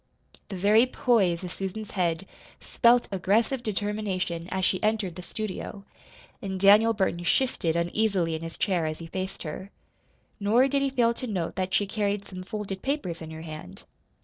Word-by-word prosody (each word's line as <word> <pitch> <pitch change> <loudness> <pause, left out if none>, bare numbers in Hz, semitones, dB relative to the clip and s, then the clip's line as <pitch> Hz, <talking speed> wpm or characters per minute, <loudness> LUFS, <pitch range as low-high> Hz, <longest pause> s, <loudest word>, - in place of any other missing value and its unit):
The 200 - -5
very 210 +6 +5
poise 205 -10 +2
of 180 - -5
Susan's 195 +3 -5
head 175 -2 0 0.3
spelt 240 0 +3
aggressive 215 +7 +1
determination 200 -5 -2
as 190 -1 0
she 185 - +1
entered 215 -5 0
the 180 - -7
studio; 200 0 -6 0.6
and 190 -1 -4
Daniel 210 +4 +6
Burton 190 -3 0
shifted 175 -6 +1
uneasily 175 0 +1
in 160 - -3
his 165 0 -7
chair 175 -5 +1
as 155 0 -3
he 165 - -8
faced 190 +3 -5
her. 180 +5 -6 0.7
Nor 225 +6 +4
did 275 +1 +1
he 275 - +2
fail 240 -3 +2
to 255 +2 -5
note 185 -7 -2
that 185 0 -1
she 205 - +3
carried 205 0 -1
some 185 -1 -7
folded 195 -1 -5
papers 270 - -2
in 160 - -7
her 160 0 -8
hand. 155 - -9
195 Hz, 175 wpm, -27 LUFS, 175-215 Hz, 0.7 s, Daniel